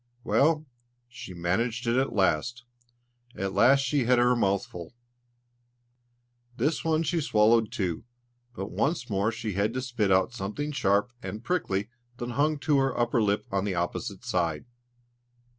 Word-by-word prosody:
Well, 155 +3 +2 0.4
she 120 -6 -10
managed 110 +8 -1
it 115 0 +1
at 135 +1 +1
last; 105 +5 0 0.7
at 95 0 -3
last 125 +8 +5
she 135 -1 0
had 125 +1 +4
her 120 +1 +4
mouthful. 100 -3 -2 1.6
This 145 +5 0
one 160 0 +1
she 165 0 0
swallowed 110 -3 +3
too, 90 -5 -2 0.5
but 95 +1 -5
once 140 -6 -1
more 100 +3 +1
she 115 -2 -4
had 105 +5 0
to 130 - -1
spit 120 -6 0
out 95 +6 +3
something 120 +8 -4
sharp 100 -3 +1
and 110 +2 -6
prickly 110 - -1 0.3
that 120 0 -4
hung 150 +4 +1
to 145 -2 +3
her 135 -2 0
upper 120 0 +2
lip 105 -1 +1
on 95 -1 0
the 100 -3 -2
opposite 95 +5 -3
side. 85 -8 -1
115 Hz, 150 wpm, -27 LUFS, 100-130 Hz, 1.6 s, last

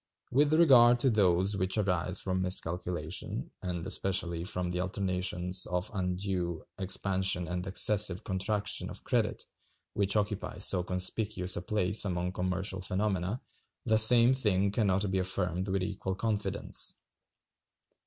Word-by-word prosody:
With 145 +3 +3
regard 125 -7 +6
to 135 - +3
those 95 -1 +3
which 95 +2 -1
arise 90 -2 0
from 95 -1 -2
miscalculation, 90 -2 -3
and 90 -2 -4
especially 90 -3 -1
from 90 0 -1
the 90 0 -2
alternations 90 -1 -1
of 90 +3 -2
undue 90 -2 -3
expansion 95 -1 -1
and 90 +2 -4
excessive 100 -1 +3
contraction 105 +2 -2
of - - -1
credit, - - -1 0.5
which 100 0 +1
occupy 100 -4 -2
so 95 -1 +2
conspicuous 90 +1 -1
a - - -3
place 100 +1 +1
among 90 -2 -2
commercial 95 +1 -3
phenomena, 95 +2 -2 0.4
the 110 0 +4
same 120 +3 +7
thing 100 -6 +1
can 105 0 0
not 95 +1 0
be 95 - 0
affirmed 90 0 -2
with 95 -1 -1
equal 95 -1 -4
confidence. 105 0 -2
95 Hz, 135 wpm, -30 LUFS, 90-105 Hz, 0.5 s, same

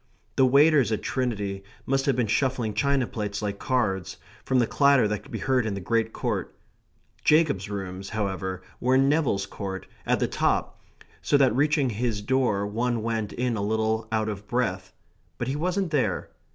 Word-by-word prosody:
The 130 - +5
waiters 140 -2 +5
at 110 - -1
Trinity 100 -6 -2 0.2
must 135 +1 0
have 135 - +3
been 125 -2 +1
shuffling 120 0 0
china 135 +4 +1
plates 105 -3 -4
like 100 -1 -3
cards, 95 -7 -1 0.3
from 130 - +1
the 120 - +4
clatter 140 -3 +4
that 105 -1 -2
could - - -17
be 115 - -3
heard 125 +5 +1
in 110 -2 -2
the - - -4
Great 115 +3 0
Court. - - -3 0.7
Jacob's 150 - +3
rooms, 95 -1 -5
however, 95 -3 -3 0.2
were 130 +1 +2
in 135 +1 +4
Neville's 140 -10 +1
Court; 95 -1 -6 0.2
at - - +2
the - - +1
top; - - 0 0.4
so 145 - +3
that 130 -5 +3
reaching 145 -1 +2
his 110 -1 -2
door 120 -5 +1
one 115 +2 -1
went 110 -2 -2
in 125 -1 -1
a 105 - -2
little 110 +1 0
out 110 -1 0
of 105 -1 -5
breath; 95 -7 -1 0.5
but 120 - -3
he 135 - -1
wasn't 180 +3 -1
there. 125 - 0
115 Hz, 180 wpm, -26 LUFS, 100-130 Hz, 0.7 s, The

